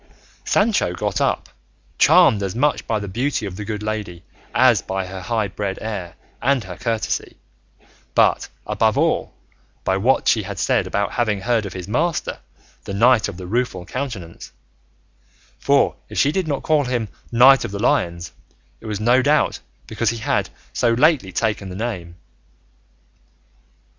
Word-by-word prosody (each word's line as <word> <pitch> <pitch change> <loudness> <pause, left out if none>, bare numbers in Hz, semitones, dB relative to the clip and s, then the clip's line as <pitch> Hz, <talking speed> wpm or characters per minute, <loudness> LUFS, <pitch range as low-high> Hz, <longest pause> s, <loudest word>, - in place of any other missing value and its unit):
Sancho 205 - +2
got 90 - -2
up, - - 0 0.5
charmed 105 - +6
as 95 0 -3
much 145 +4 0
by 110 - 0
the 105 -1 -5
beauty 120 +4 -1
of 95 -2 -6
the 105 - -6
good 105 0 -5
lady 105 -5 -4 0.3
as 120 -4 +4
by 95 0 -3
her 95 0 -7
high 110 +1 -1
bred 100 0 -4
air 100 -6 -5 0.3
and 135 -2 +2
her 90 -2 -8
courtesy, 115 +2 -3 0.8
but, - - +3 0.2
above - - +1
all, - - +1 0.5
by 95 - +1
what 120 +7 +2
she 110 - +4
had 100 -1 -7
said - - +1
about 100 0 -1
having 110 -5 0
heard 115 -1 0
of 95 - -8
his 90 -1 -7
master, 155 +10 -1 0.5
the 100 - -5
Knight 115 0 +4
of 100 -3 -7
the 90 - -7
Rueful 100 -3 -2
Countenance; 105 -8 -6 1.1
for 140 0 +3
if - - -8
she 140 - +3
did 185 +1 -1
not 140 -3 -2
call 150 -3 +2
him 120 -3 -1 0.2
Knight 130 +3 +6
of - - -3
the 100 - -5
Lions 85 -6 0 0.5
it 110 - -10
was 105 -2 -3
no 120 +4 +4
doubt 150 +3 +2 0.3
because 115 - -1
he 115 - -2
had 110 - -1 0.2
so 115 - +2
lately 130 - +3
taken 105 0 -1
the 90 - -7
name. 95 -6 -4
110 Hz, 165 wpm, -21 LUFS, 95-125 Hz, 1.1 s, charmed